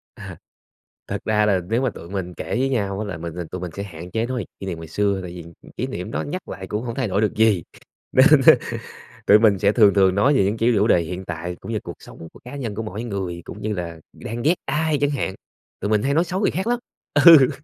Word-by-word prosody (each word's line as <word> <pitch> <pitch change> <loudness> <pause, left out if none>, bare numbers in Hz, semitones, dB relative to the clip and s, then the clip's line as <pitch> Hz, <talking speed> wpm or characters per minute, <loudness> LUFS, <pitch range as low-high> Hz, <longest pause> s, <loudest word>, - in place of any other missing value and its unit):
À. - - -9 0.7
Thật - - -4
ra 105 -1 +2
là 95 -3 +2
nếu 115 +3 +1
mà 130 - +1
tụi 85 -6 -11
mình 95 -2 -4
kể - - -7
với 135 +1 +1
nhau 100 -6 -1
á 110 - -2
là 95 -5 -5
mình 85 0 -6 0.2
tụi 90 - -5
mình 90 - -5
sẽ 100 - -4
hạn 90 -2 -9
chế 115 +1 0
nói 125 0 -3
về - - -6
kỷ - - -6
niệm 85 -3 -4
ngày 80 - -8
xưa, 100 +3 0
tại 90 -2 -7
vì, 90 -1 -8
ừm, 85 +1 -14 0.2
kỷ - - -2
niệm - - -6
đó 75 - -2
nhắc 75 - -6
lại - - -7
cũng 105 +2 -3
hông 115 -2 -5
thay 130 -4 -1
đổi 100 +1 0
được 105 - 0
gì, 110 -6 +3 0.5
nên, 130 - +7 0.2
ơ, - - +11 0.7
tụi 105 - +8
mình 105 -4 +4
sẽ 100 +1 +3
thường 105 -3 +5
thường 95 -2 +4
nói 135 +8 +4
về - - +4
những, 100 +3 0
kiểu, 115 +2 +3
chủ 105 +3 +3
đề 85 - +4
hiện 90 +3 -6
tại 85 +1 -5
cũng - - -7
như 110 - -1
cuộc 85 - -7
sống 80 - -12
của - - -15
cá 125 - -8
nhân 120 -7 -4
của 110 - -3
mỗi 110 +1 -5
người, 95 -6 -4
cũng 105 - -9
như 105 0 -2
là 85 -3 -5
đang 115 +2 -6
ghét 160 +5 +4
ai 155 0 0
chẳng 145 - +3
hạn, 95 -9 -2 0.5
tụi 100 - -2
mình 105 -1 +2
hay 140 - +1
nói 165 +4 +3
xấu 180 +2 -3
người - - +2
khác 190 +4 -3
lắm. 240 0 +1 0.5
Ừ. 155 -7 +9
105 Hz, 275 wpm, -22 LUFS, 90-120 Hz, 0.7 s, ơ